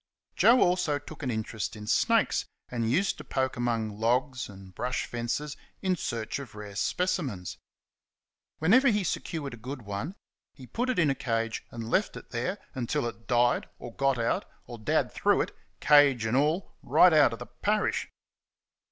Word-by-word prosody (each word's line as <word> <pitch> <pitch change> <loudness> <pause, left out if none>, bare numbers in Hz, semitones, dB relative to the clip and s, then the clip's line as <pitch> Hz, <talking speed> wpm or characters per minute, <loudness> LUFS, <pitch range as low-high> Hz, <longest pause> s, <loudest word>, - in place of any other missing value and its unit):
Joe 245 +2 +6
also 175 -5 +2
took 145 +2 -11
an 135 - -2
interest 110 -2 -3
in 105 -1 -8
snakes, - - +2 0.2
and 115 -2 -1
used 185 +11 +1
to - - -7
poke 130 -1 -1
amongst 115 -3 -1
logs 125 +3 0
and 95 -2 -12
brush 125 +6 -2
fences 120 +5 -3 0.3
in 185 -1 +2
search 115 -5 -3
of 130 -6 -9
rare 105 -1 -8
specimens. 140 - -1 1.0
Whenever 225 - +5
he 210 -4 +3
secured 155 -5 -3
a - - -8
good 125 +3 -7
one 100 - -4 0.4
he 130 - -11
put 245 - -2
it 255 - 0
in 160 -5 +4
a - - +2
cage 115 -3 -2
and 115 -1 -6
left 200 - +1
it - - -12
there 125 +11 -2 0.2
until 130 +2 -1
it 115 -1 -7
died 120 0 +2
or 120 - -9
got 135 0 +1
out, 115 0 0 0.2
or 120 -1 -9
Dad 110 - +1
threw - - +2
it, - - -2 0.3
cage 145 -6 +5
and 110 +2 0
all, 155 +7 +1
right 180 -2 +5
out 150 -5 +6
of 115 - -5
the 125 - -7
parish. 205 +14 -1
125 Hz, 175 wpm, -28 LUFS, 115-155 Hz, 1.0 s, Joe